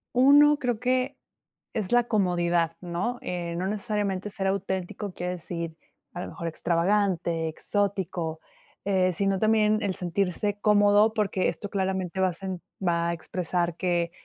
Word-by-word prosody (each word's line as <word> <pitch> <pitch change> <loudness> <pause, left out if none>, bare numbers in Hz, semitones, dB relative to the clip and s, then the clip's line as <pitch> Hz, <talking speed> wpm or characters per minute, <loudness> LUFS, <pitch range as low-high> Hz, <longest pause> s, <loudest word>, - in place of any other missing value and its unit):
Uno, 290 +3 +7
creo 245 -4 0
que 255 +2 0 0.6
es 215 -3 -2
la 245 0 +5
comodidad, 175 -6 +1
¿no? 180 +8 -2
Eh, 170 -1 -4
no 185 - -1
necesariamente 205 -2 -2
ser 195 -1 -2
auténtico 190 0 -2
quiere 180 +1 -3
decir, 170 -2 -5 0.4
a 175 - -6
lo - - -5
mejor, 170 - -6
extravagante, 170 -1 +1
exótico, 180 -2 -2 0.4
eh, 185 -2 +2
sino 195 +2 0
también 215 -1 +3
el 195 -2 -1
sentirse 195 +3 -1
cómodo, 205 +1 +5
porque, 200 -4 0
esto 205 - -5
claramente 190 -2 -2
va 190 - +4
a - - -5
sen 185 0 -5 0.2
va 170 -1 +2
a - - 0
expresar 175 0 -2
que 175 -2 0
190 Hz, 145 wpm, -27 LUFS, 175-210 Hz, 0.6 s, Uno